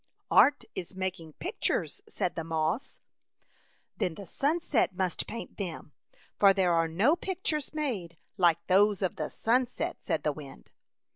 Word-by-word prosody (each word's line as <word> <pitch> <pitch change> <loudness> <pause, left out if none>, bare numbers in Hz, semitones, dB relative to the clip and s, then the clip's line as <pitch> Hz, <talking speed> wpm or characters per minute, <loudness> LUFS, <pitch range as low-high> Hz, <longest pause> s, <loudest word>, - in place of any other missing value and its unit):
" - - -45
Art 290 - +6
is 180 +1 -6
making 185 -4 -4
pictures," 400 - -2
said 180 - -1
the 165 - -4
moss. 160 - -2 0.5
" - - -38
Then 170 - -1
the 200 - -8
sunset 285 - +1
must 185 -2 -1
paint 230 - -7
them, 170 -6 -5 0.5
for 200 -1 +7
there 185 -3 +2
are 165 0 +3
no 200 - +3
pictures 345 -6 -2
made 220 - -3 0.2
like 175 -4 +3
those 200 +1 +4
of 185 - -1
the 155 - -2
sunset,'* 255 +8 0
said 160 - -1
the 150 - +1
wind. 145 -2 -11
190 Hz, 155 wpm, -29 LUFS, 165-260 Hz, 0.5 s, for